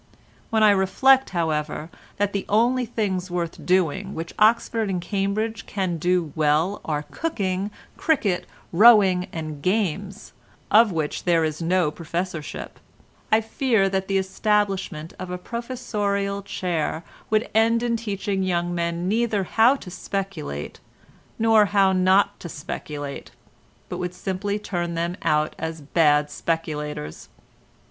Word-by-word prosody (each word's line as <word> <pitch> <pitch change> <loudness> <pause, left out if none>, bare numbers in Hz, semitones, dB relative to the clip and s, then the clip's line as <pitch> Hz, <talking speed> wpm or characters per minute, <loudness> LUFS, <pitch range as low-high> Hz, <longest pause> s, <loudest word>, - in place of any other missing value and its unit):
When 220 -1 +2
I 210 - +7
reflect, 260 +8 +4
however, 160 -2 -2 0.3
that 205 0 0
the 200 - -3
only 240 +4 +2
things 195 -5 -2
worth 175 -2 -3
doing 185 +2 +1
which 165 +1 -5
Oxford 220 0 +3
and 185 -2 -1
Cambridge 205 +4 -2
can 185 -4 -2
do 175 -2 0
well 155 +5 +1
are 150 -2 -2
cooking, 200 - -2 0.3
cricket, 210 - +1 0.3
rowing 195 -3 +6
and 155 -3 -6
games, 195 +1 -2 0.4
of 220 0 +6
which 160 -3 -3
there 170 -2 +3
is 155 +1 -2
no 170 -2 +2
professorship, 170 0 -5 0.5
I 220 +1 +5
fear 225 -3 +1
that 190 0 -1
the 195 - +1
establishment 190 -4 -1
of 185 - -6
a 180 - -3
professorial 205 -3 -2
chair 175 -4 -2 0.3
would 215 +1 +2
end 230 +1 +3
in 235 -1 +1
teaching 200 -3 -2
young 175 -2 0
men 170 0 -2
neither 220 -1 +1
how 230 +7 +4
to 190 -9 -10
speculate, 180 - -5 0.6
nor 225 -1 +5
how 195 -1 +3
not 185 +2 +3
to 170 - -7
speculate, 145 -1 -6 0.6
but - - -5
would 180 0 -4
simply 195 +3 -2
turn 175 -5 -3
them 170 +1 -1
out 150 0 +1
as 160 0 -4
bad 150 0 +2
speculators. 150 - -4
190 Hz, 135 wpm, -24 LUFS, 165-210 Hz, 0.6 s, I